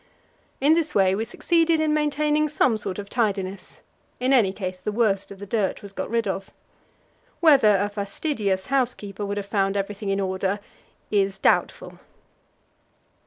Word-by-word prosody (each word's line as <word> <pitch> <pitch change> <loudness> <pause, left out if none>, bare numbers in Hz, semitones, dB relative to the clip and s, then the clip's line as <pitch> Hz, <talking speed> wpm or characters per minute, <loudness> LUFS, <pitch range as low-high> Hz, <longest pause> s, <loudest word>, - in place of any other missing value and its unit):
In 285 +4 +4
this 320 -2 0
way 190 -1 +4
we 215 +3 -1
succeeded 330 +6 +1
in 310 -1 +1
maintaining 300 0 +1
some 260 -5 +2
sort 195 -3 -4
of 205 -1 -6
tidiness; 195 -4 -2 0.4
in 255 +2 +2
any 220 -8 +4
case, 185 -2 -5
the 210 - -3
worst 205 -3 +1
of 200 - -10
the 200 - -8
dirt 205 -1 -1
was 200 - -8
got - - -5
rid 230 -1 0
of. 195 0 -3 0.9
Whether 270 - +6
a 200 +2 0
fastidious 200 -1 -2
housekeeper 215 -6 -1
would 200 0 -3
have 200 - -3
found 200 -1 0
everything 200 +1 -3
in 195 0 0
order 190 +1 -1 0.5
is 195 -2 +1
doubtful. - - 0
205 Hz, 160 wpm, -24 LUFS, 195-260 Hz, 0.9 s, Whether